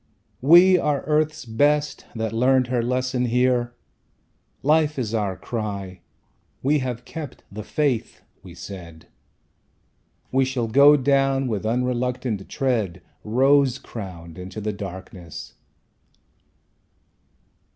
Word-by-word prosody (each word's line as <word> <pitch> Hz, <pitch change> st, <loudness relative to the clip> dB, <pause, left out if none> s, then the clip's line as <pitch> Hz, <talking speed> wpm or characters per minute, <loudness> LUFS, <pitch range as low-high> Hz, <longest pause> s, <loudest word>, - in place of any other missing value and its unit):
"We 175 Hz, +6 st, +7 dB
are 145 Hz, -3 st, 0 dB
Earth's 155 Hz, 0 st, 0 dB
best, 145 Hz, +6 st, +1 dB
that 110 Hz, -1 st, -2 dB
learnt 130 Hz, +2 st, +3 dB
her 125 Hz, -2 st, +1 dB
lesson 125 Hz, +1 st, 0 dB
here. 120 Hz, 0 st, +1 dB, 0.9 s
Life 155 Hz, 0 st, +3 dB
is 115 Hz, -4 st, -2 dB
our 100 Hz, -4 st, -1 dB
cry. 100 Hz, -5 st, -5 dB, 0.6 s
We 145 Hz, +3 st, +3 dB
have 125 Hz, -2 st, -4 dB
kept 160 Hz, -4 st, -8 dB
the 105 Hz, +2 st, -6 dB
faith!" 135 Hz, +1 st, -1 dB, 0.2 s
we 90 Hz, -3 st, -12 dB
said; 85 Hz, -3 st, -10 dB, 1.3 s
"We 135 Hz, +1 st, +3 dB
shall 130 Hz, -3 st, -1 dB
go 140 Hz, +6 st, +7 dB
down 135 Hz, 0 st, +2 dB
with 110 Hz, -2 st, -2 dB
unreluctant 125 Hz, -3 st, -1 dB
tread 110 Hz, -, -1 dB, 0.2 s
Rose 135 Hz, +3 st, +3 dB
crowned 90 Hz, -9 st, -9 dB
into 95 Hz, +4 st, -7 dB
the 105 Hz, 0 st, -3 dB
darkness!" 95 Hz, -3 st, -8 dB
125 Hz, 110 wpm, -23 LUFS, 105-135 Hz, 1.3 s, We